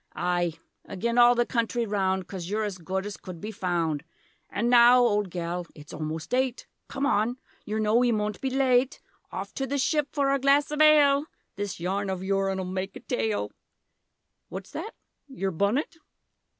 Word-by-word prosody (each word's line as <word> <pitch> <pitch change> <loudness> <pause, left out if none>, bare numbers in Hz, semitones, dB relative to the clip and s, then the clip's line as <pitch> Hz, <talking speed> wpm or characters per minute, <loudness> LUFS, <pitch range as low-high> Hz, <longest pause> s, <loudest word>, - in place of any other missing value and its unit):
Aye; 175 -1 0 0.4
agen 235 +5 0
all 240 0 +7
the 240 0 +2
country 235 0 0
round, 190 -3 0
Coz 180 -3 -6
you're 215 +2 0
as 200 -3 -4
good 190 +3 -3
as 205 -1 -6
could 180 -3 -9
be 210 +6 -5
found 170 -6 -1 0.5
An' 230 +4 -1
now 240 0 +7
old 210 -5 +2
gel 175 0 -3
it's 150 -1 -12
omost 155 +3 -5
eight, 255 -1 0 0.2
Come 275 - -2
on 235 -1 +1 0.3
yer 215 +1 -3
know 215 0 +1
we 245 0 +4
moant 210 -1 -2
be 265 - 0
late, 260 -1 +2 0.3
Off - - -6
to 270 - -3
the 285 +2 -1
Ship 295 +1 +1
for 280 -2 +1
our 275 - +2
glass 280 +3 +3
of 300 - -3
aale; 295 -2 +6 0.3
This 205 -2 -4
yarn 195 +3 -2
of 190 -1 -3
yourn'll 195 -1 0
make 185 +1 -4
a - - -7
taale! 105 -2 -1 1.0
What's 190 +1 -8
that 385 +8 -6 0.3
yer 195 -9 -3
bunnet? 225 - 0
210 Hz, 175 wpm, -27 LUFS, 185-255 Hz, 1.0 s, all